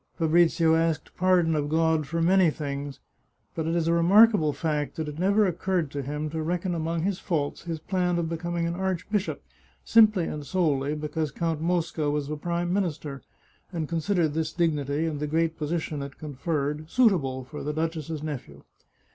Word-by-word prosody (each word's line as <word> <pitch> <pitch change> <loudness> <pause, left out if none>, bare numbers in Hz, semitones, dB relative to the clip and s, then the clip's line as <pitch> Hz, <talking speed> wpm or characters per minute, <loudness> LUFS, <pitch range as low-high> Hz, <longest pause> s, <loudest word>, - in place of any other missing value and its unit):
Fabrizio 165 0 +3
asked 160 -1 0
pardon 180 -3 +3
of 145 -1 -1
God 160 -1 +2
for 165 +2 -1
many 185 0 +5
things, 140 -2 -5 0.5
but 160 -1 -3
it 165 - 0
is 165 -1 +1
a 165 - +3
remarkable 185 -1 +5
fact 150 0 -2
that 160 -1 -3
it 150 +1 -6
never 200 +3 +3
occurred 180 -3 -1
to 145 - -3
him 150 +3 -3
to 160 0 -3
reckon 175 +3 -1
among 165 0 -2
his 190 0 -1
faults 155 -5 -2
his 165 -2 -3
plan 180 +1 -1
of 170 -1 -1
becoming 170 +1 -2
an 170 - -1
archbishop 190 +2 -2 0.4
simply 215 -5 +5
and 150 -2 -5
solely 145 -4 0
because 150 +1 -2
Count 160 +1 -2
Mosca 165 -3 0
was 145 -1 -1
a - - -1
prime 175 +3 -2
minister, 155 -7 -2 0.5
and 165 -4 -3
considered 165 +1 +1
this 160 0 -1
dignity, 150 -3 0
and 155 -3 -2
the 150 - -2
great 165 +1 0
position 155 -1 -3
it 140 -1 -7
conferred, 150 +1 -3
suitable 160 - +2
for 150 +4 -8
the 150 - -2
duchess's 160 -1 -3
nephew. 125 - -6
160 Hz, 175 wpm, -26 LUFS, 150-175 Hz, 0.5 s, many